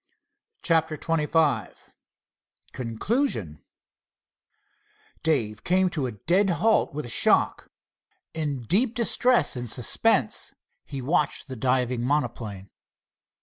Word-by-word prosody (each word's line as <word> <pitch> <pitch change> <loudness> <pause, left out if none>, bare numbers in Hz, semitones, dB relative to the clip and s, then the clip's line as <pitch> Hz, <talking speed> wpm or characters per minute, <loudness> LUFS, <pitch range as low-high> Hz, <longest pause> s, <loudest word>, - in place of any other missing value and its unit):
CHAPTER 160 -2 +2
XXV 155 -7 0 1.0
CONCLUSION 115 - -2 1.6
Dave 115 -10 -1
came 185 0 +2
to 145 -5 -2
a 120 - -6
dead 185 - +1
halt 215 +6 +2
with 150 0 -5
a - - -7
shock. 115 - +2 0.6
In 145 -5 -3
deep 220 - +1
distress 240 - +2
and 120 -1 -5
suspense 120 0 +1 0.3
he 135 -2 -6
watched 150 +1 0
the 130 - -7
diving 125 0 0
monoplane. 120 -8 -2
145 Hz, 100 wpm, -25 LUFS, 120-170 Hz, 1.6 s, CHAPTER